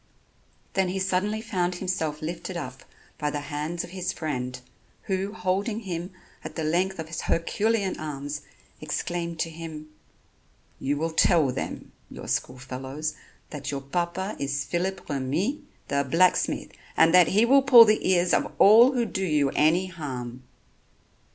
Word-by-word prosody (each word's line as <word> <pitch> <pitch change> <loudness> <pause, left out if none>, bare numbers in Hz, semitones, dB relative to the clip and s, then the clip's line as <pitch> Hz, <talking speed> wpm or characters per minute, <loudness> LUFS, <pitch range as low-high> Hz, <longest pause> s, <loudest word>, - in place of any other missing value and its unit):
Then 190 -1 +2
he 190 - -2
suddenly 190 +3 0
found 185 -5 -1
himself 160 -5 -2
lifted 170 +2 -4
up 130 -5 -6 0.4
by 150 -1 0
the 145 - -3
hands 150 +4 -4
of - - -10
his 185 -1 -2
friend, 125 -5 -4 0.4
who, 195 +1 -2
holding 200 +3 -1
him 180 -3 -4 0.3
at - - -7
the 160 - -2
length 180 +5 0
of 160 -1 -5
his 160 - -5
herculean 200 +4 0
arms, 145 -1 -5 0.4
exclaimed 170 +2 -3
to 165 - -2
him: 160 -2 -8 0.9
"You 145 +2 -1
will 165 +2 -1
tell 160 -4 +4
them, - - -5 0.2
your - - -9
school 130 - -1
fellows, 130 +4 -5 0.4
that 145 -2 -5
your 140 -1 -3
papa 175 +7 -2
is 140 0 -2
Phillip 185 +4 -2
Remy, 155 - -1 0.3
the 140 0 +1
blacksmith, 165 +7 +2 0.3
and 165 +1 +5
that 180 -2 +7
he 215 +4 +4
will 275 +3 +6
pull 250 -4 +9
the 215 0 +2
ears 175 -1 +3
of - - +1
all 230 +6 +7
who 245 -2 +1
do 195 -3 -3
you 150 -6 +2
any 165 +5 +3
harm." 130 -8 -6
170 Hz, 155 wpm, -26 LUFS, 150-190 Hz, 0.9 s, pull